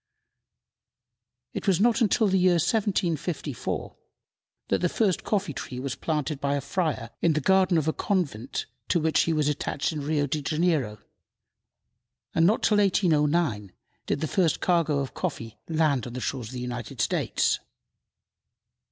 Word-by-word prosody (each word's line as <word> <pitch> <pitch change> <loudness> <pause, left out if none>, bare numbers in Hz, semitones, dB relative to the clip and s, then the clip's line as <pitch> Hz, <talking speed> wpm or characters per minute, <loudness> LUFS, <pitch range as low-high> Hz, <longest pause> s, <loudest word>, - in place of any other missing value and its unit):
It - - -5
was 185 -3 +3
not 235 +2 +4
till 220 +1 +3
the 190 -1 +2
year 180 0 +4
1754 170 - -1 0.7
that - - +2
the 180 - +2
first 200 -3 +1
coffee 195 -7 -1
tree 125 -2 -6
was 135 0 -3
planted 150 -2 -2
by 140 0 +1
a - - 0
friar 140 - -2
in 165 - +3
the 155 - +1
garden 190 +2 +3
of 155 - +1
the 160 - +1
convent 140 - -2 0.2
to 175 - +2
which 160 0 +2
he 165 - 0
was 155 -2 +1
attached 150 0 -1
in 155 -2 -4
Rio 145 0 0
Janeiro, 150 -5 0 1.4
and 165 +1 +4
not 215 - +2
till 210 - +4
1809 155 - +2 0.3
did 145 - -1
the 155 - 0
first 175 -3 +1
cargo 165 -5 +2
of 135 - -5
coffee 115 - -5
land 155 -6 +1
on 120 - -8
the 125 - -4
shores 125 -2 -3
of 120 - -10
the 125 - -5
United 120 -2 -6
States. - - +1
155 Hz, 155 wpm, -26 LUFS, 140-180 Hz, 1.4 s, not